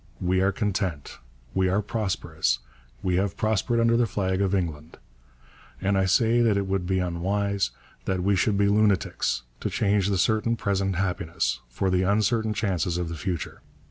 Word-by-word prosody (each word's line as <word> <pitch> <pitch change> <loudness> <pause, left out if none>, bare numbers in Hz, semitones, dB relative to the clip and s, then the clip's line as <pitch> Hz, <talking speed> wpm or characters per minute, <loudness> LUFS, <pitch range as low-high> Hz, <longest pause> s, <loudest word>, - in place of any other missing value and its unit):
We 95 +1 +1
are 95 +1 +3
content, 95 -7 -3 0.3
we 95 -1 +2
are 100 +3 +1
prosperous, 105 -2 -1 0.5
we 90 -1 +1
have 95 0 -1
prospered 110 +2 +1
under 115 0 +4
the 120 0 +3
flag 95 -1 -1
of 100 0 +1
England; 80 -4 -3 0.8
and 100 +1 +1
I 95 -1 +2
say 115 +5 +3
that 110 -4 +3
it 100 - 0
would 95 -2 -1
be 95 0 +1
unwise, 95 0 0 0.4
that 95 -2 -1
we 100 +1 +3
should 100 +2 +1
be 100 0 +3
lunatics, 100 - +1 0.2
to - - -2
change 100 -2 +1
the 100 -1 +1
certain 110 +4 +2
present 100 -3 -1
happiness 85 -8 -1
for 95 +10 -1
the 90 0 +2
uncertain 110 +3 +1
chances 90 -5 0
of 90 -2 -2
the 85 - -5
future. 90 0 -4
95 Hz, 175 wpm, -26 LUFS, 90-105 Hz, 0.8 s, under